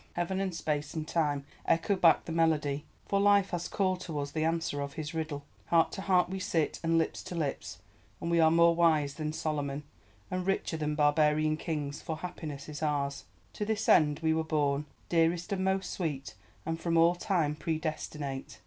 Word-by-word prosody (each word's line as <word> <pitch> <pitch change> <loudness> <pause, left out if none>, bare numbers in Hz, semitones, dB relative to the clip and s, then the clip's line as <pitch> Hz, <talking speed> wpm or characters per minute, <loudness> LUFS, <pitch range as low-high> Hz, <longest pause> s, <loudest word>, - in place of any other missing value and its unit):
Heaven 180 +2 -1
and 195 -1 -1
Space 150 -2 -2
and 155 -1 -3
Time, 145 -4 0 0.2
echo 165 +5 +2
back 175 -3 +4
the - - -5
melody! 155 -3 +1 0.2
For 200 - +1
Life 200 -1 +4
has 175 -1 -2
called 185 -2 0
to 165 -4 -5
us 140 0 -3
the 155 +1 -1
answer 165 -3 0
of 140 0 -4
his 155 +2 -5
riddle! 155 -3 -3 0.2
Heart 165 -1 +3
to - - -5
heart 180 -2 +3
we 190 +1 -4
sit, 165 -4 0
and 165 0 +2
lips 165 - 0
to 180 - -7
lips, 125 - -3 0.4
and 170 - -3
we 170 - +3
are 160 -1 +6
more 170 +1 +5
wise 160 -4 +3
than 155 0 -3
Solomon, 145 -2 -2 0.5
and 185 0 -1
richer 195 -3 0
than 150 -1 -1
barbarian 150 +1 +3
kings, 150 -3 -4
for 160 -3 -4
Happiness 155 -4 -6
is 150 -1 -7
ours. 140 -2 -1 0.3
To - - -3
this 220 0 -1
end 150 -1 +4
were 160 -1 +2
we 160 - +1
born, 150 -2 0 0.2
Dearest 170 +3 +1
and 190 -1 -1
most 190 -1 0
sweet, 145 -7 -3 0.3
and 165 0 -2
from 165 0 0
all 165 +1 +6
time 175 -4 0
predestinate! 155 -3 -4
160 Hz, 195 wpm, -30 LUFS, 150-170 Hz, 0.5 s, are